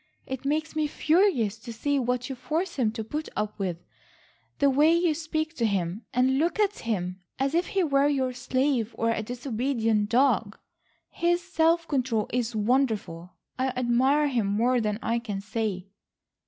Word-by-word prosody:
It 265 0 -6
makes 310 +3 -1
me 310 -1 +1
furious 300 - +2
to 235 +1 -8
see 280 +5 0
what 250 0 -1
you 270 - -4
force 325 +8 -2
him 240 -5 +2
to 225 -1 -4
put 300 +8 -4
up 210 0 -3
with, 185 -4 -2 0.8
the 280 - +3
way 290 +4 +4
you 340 -2 +2
speak 315 +1 -3
to 235 - +1
him, 190 +1 -2
and 260 +2 +2
look 340 +6 0
at 415 -1 +1
him, 185 -5 -3 0.2
as 270 +2 0
if 345 +2 +1
he 390 -2 +1
were 280 -3 +3
your 265 -3 0
slave, 255 -2 0
or 230 0 +1
a 225 - -1
disobedient 230 -2 -1
dog. 230 -4 +2 0.5
His 345 +1 +1
self 335 -2 +2
control 250 -6 0
is 240 -2 -1
wonderful. 210 -7 0 0.2
I 260 - +2
admire 260 +5 +3
him 240 -7 0
more 235 +5 +2
than 210 -1 -1
I 230 +1 +1
can 210 -4 -4
say." 205 -2 -3
250 Hz, 170 wpm, -27 LUFS, 220-295 Hz, 0.8 s, way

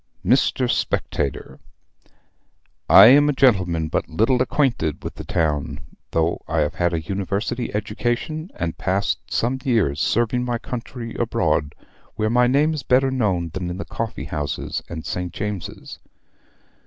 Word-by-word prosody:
"MR. 130 0 +2
SPECTATOR, 70 - -2 1.3
I 95 - +10
am 145 +5 +7
a - - +2
gentleman 90 -12 +2
but - - -2
little 115 +10 +2
acquainted 130 - 0
with - - -5
the - - -8
town, 75 -3 -1 0.3
though 80 +1 0
I 80 - 0
have 75 - 0
had 85 -1 0
a 85 - -1
university 100 +7 -3
education, 120 - -2
and 85 -1 -4
passed 95 +3 0
some 125 +3 0
years 100 - +1
serving 120 +2 +1
my 120 -1 -1
country 115 -1 -6
abroad, 75 0 0 0.4
where 110 0 0
my 125 +1 +4
name 145 +5 +3
is 155 - -3
better 130 +2 +2
known 95 -10 0
than 90 -2 -3
in 90 - -5
the 100 - -5
coffee 110 -11 -4
house 70 0 -3
and 80 -2 -6
St. 90 -1 -3
James's. 105 -4 -6
105 Hz, 145 wpm, -22 LUFS, 85-125 Hz, 1.3 s, I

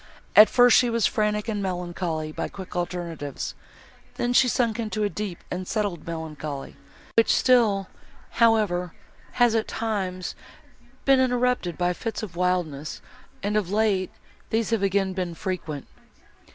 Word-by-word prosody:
At 215 0 +10
first, 245 -1 +6
she 245 - +4
was 230 -3 +1
frantic 210 -2 0
and 210 -2 -2
melancholy 175 -4 -3
by - - -3
quick 190 -2 -9
alternatives; 170 -5 -4 0.6
then, 240 0 0
she 255 - +5
sunk 235 -2 +1
into 215 -1 -2
a 205 - +1
deep 200 -4 -5
and 180 0 -4
settled 205 -8 -2
melancholy, 155 -4 -5 0.4
which 230 - +5
still, 220 -7 +3 0.5
however, 205 -7 +3 0.4
has, 240 -2 +4
at 225 -1 +1
times, 190 -5 -3 0.7
been 270 -1 +5
interrupted 250 -8 +1
by 180 0 +1
fits 225 +4 -4
of 185 -5 -7
wildness, 175 -5 -1 0.4
and, 205 +1 -1
of 210 -5 +1
late, 205 -3 +1 0.4
these 225 0 0
have 225 -3 +1
again 195 -1 +1
been 180 -2 -3
frequent." 160 -6 -4
195 Hz, 140 wpm, -25 LUFS, 175-225 Hz, 0.7 s, At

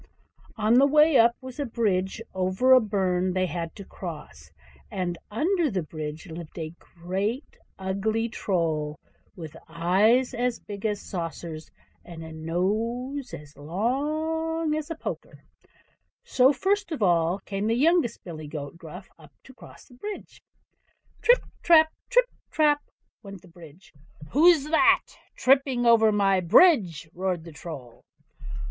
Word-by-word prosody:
On 220 +3 +4
the 280 - +5
way 300 +1 +4
up 235 +1 +5
was 260 +1 -10
a 285 - -1
bridge 210 -3 -1
over 190 +8 +2
a 255 - +8
burn 185 -4 0
they 185 0 +1
had 170 -1 -5
to 200 - -10
cross; 150 - -9 0.4
and 180 -2 -3
under 330 - +1
the 190 -6 -2
bridge 155 +1 -7
lived 170 -1 -10
a 160 -1 -5
great 195 - -4 0.2
ugly 200 +4 -1
Troll, 160 -9 -2 0.4
with 160 -3 -9
eyes 195 +10 +2
as 245 0 -1
big 205 +1 -5
as 205 -1 -2
saucers, 165 -3 -6 0.3
and 165 -2 -10
a 160 - -9
nose 225 - -2
as 145 0 -10
long 305 - -2
as 310 0 -3
a 330 - -4
poker. - - -7 0.8
So 260 +1 +4
first 390 +6 -1
of 290 -9 -2
all 170 -1 +2
came 200 +1 -4
the 225 - +1
youngest 320 0 +2
billy 155 -4 -8
goat 145 +1 -7
Gruff 180 +4 -10 0.4
to 265 - -15
cross - - -15
the - - -20
bridge. 405 +12 -8 0.8
"Trip, 485 +1 +4 0.2
trap; 320 -2 +5 0.2
trip, - - +4 0.2
trap!" 295 -2 +2 0.4
went 195 -3 -11
the - - -16
bridge. 170 0 -16 0.4
"WHO'S 310 0 +5
THAT 320 - +3 0.2
tripping 265 -2 +2
over 225 -2 +5
my 195 -2 +2
bridge?" 185 - +4
roared 180 -2 -2
the 165 - -11
Troll. 140 -5 -10
200 Hz, 140 wpm, -26 LUFS, 170-265 Hz, 0.8 s, a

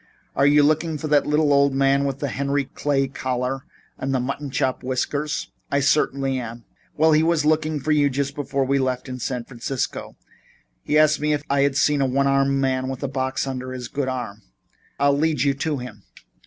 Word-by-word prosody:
"Are 140 - +4
you 145 0 +5
looking 155 +2 +1
for 155 - -4
that 145 -1 +3
little 150 -1 +3
old 140 -1 +3
man 135 +1 +3
with 135 -1 -2
the 145 - -1
Henry 140 +2 -1
Clay 135 0 -1
collar 130 0 -3 0.3
and 135 - -2
the 135 - +1
white 125 - -1
mutton 140 +2 -4
chop 130 -1 -1
whiskers?" 135 +4 -2 0.2
"I 140 - +1
certainly 135 -2 +1
am." 115 -1 -8 0.3
"Well, 160 +1 +4
he 155 0 +5
was 165 -2 +2
looking 155 0 +1
for 155 +3 -2
you 145 -2 +4
just 140 +1 -2
before 140 -1 -1
we 140 +1 +1
left 130 -1 -1
San 125 0 -2
Francisco. 125 +1 -4 0.7
He 150 - +1
asked 155 0 +4
me 150 +1 +1
if 145 -1 -2
I 140 0 +3
had 140 -1 +2
seen 150 -2 +3
a 135 - +2
one 135 +2 +1
armed 135 0 +2
man 130 -1 0
with 135 +1 -5
a - - 0
box 130 0 -2
under 130 -1 -5
his 125 -2 -6
good 140 -2 -2
arm. 120 -6 -4 0.6
I'll 140 0 +3
lead 150 -2 +1
you 140 -1 +2
to 145 +2 -2
him." 125 -5 -8
140 Hz, 210 wpm, -23 LUFS, 130-145 Hz, 0.7 s, you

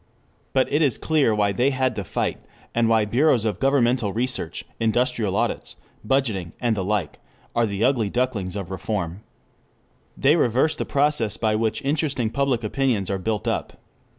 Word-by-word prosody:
But 130 -1 +3
it 150 - +3
is 140 -6 +2
clear 145 -9 +2
why 100 -1 +2
they 125 +8 +2
had 130 -3 0
to 100 - -3
fight, - - -2 0.3
and 115 -1 +2
why 110 -2 +3
bureaus 120 +1 +2
of 105 -3 -1
governmental 125 -5 +2
research, 115 -7 -3
industrial 115 -2 +1
audits, - - -2 0.3
budgeting 105 -9 0
and 120 -3 +1
the 95 - -2
like 95 -5 -2 0.4
are 120 -1 +3
the 100 +1 -2
ugly 120 -5 +2
ducklings 110 -6 -1
of 100 -4 -5
reform. 95 -2 -3 1.0
They 145 +4 +4
reverse 130 +1 +2
the - - -3
process 140 -6 +1
by 110 -2 +1
which 110 0 -1
interesting 140 -5 0
public 135 -4 0
opinions 110 -4 0
are 95 - -1
built 105 +2 -2
up. - - -2
115 Hz, 165 wpm, -23 LUFS, 105-130 Hz, 1.0 s, They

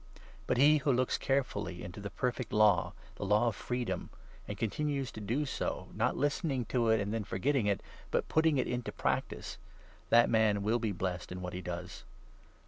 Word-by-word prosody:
But - - +1
he 150 +4 +6
who 145 -1 +1
looks 130 0 +1
carefully 135 -10 -1
into 90 +3 -7
the 100 0 -5
25 90 - -26
perfect 125 -1 -2
Law, 105 -5 +4 0.2
the - - -4
Law 105 +4 +3
of 110 - -5
Freedom, 125 +2 -3 0.4
and - - -5
continues 135 +4 -1
to 110 - -8
do 120 +9 0
so, 135 - -3
not - - 0
listening 140 -3 0
to 120 -3 +2
it 110 - +4
and 100 +1 -2
then 115 -1 -1
forgetting 120 +4 0
it, 100 -1 +1 0.3
but - - 0
putting 160 -2 +3
it - - +2
into 125 -1 -3
prac - - 0
tice— - - -7 0.5
that 115 0 +6
man 110 -3 +3
will 110 +3 +2
be 110 -2 -1
blessed 90 -2 -3
in 90 - -5
what 90 0 -5
he 90 - -4
does. 90 0 -6
115 Hz, 200 wpm, -32 LUFS, 100-130 Hz, 0.5 s, he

